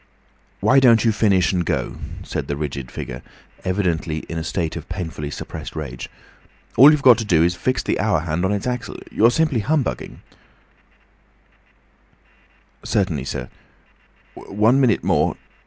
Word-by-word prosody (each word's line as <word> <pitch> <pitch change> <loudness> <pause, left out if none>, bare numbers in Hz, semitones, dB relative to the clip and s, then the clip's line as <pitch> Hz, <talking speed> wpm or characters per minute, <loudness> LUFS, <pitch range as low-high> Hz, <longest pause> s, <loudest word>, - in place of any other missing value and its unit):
"Why 135 - +5
don't 120 -4 +5
you 115 - +4
finish 100 -4 +2
and 90 -1 +1
go?" - - -2 0.3
said - - -4
the 70 - -2
rigid 70 -4 -5
figure, 60 0 -7 0.4
evidently 85 -5 -1
in 85 - -4
a - - -4
state 80 -1 -2
of - - -8
painfully 80 -4 -5
suppressed - - -7
rage. 70 -6 -6 0.7
"All 135 +6 +9
you've 150 -2 +2
got 125 -2 +7
to - - -1
do 85 -6 +3
is 85 +1 +2
to 90 - -14
fix 130 - 0
the - - -1
hour 105 -8 +1
hand 80 +1 -2
on 95 - +1
its 100 -1 -2
axle. 125 -4 -4
You're 115 +2 +4
simply 140 0 +1
humbugging—" 145 +5 -2 2.6
"Certainly, 85 -10 -1
sir—one 110 - -3
minute 120 -5 +2
more. - - +1
95 Hz, 150 wpm, -21 LUFS, 80-120 Hz, 2.6 s, All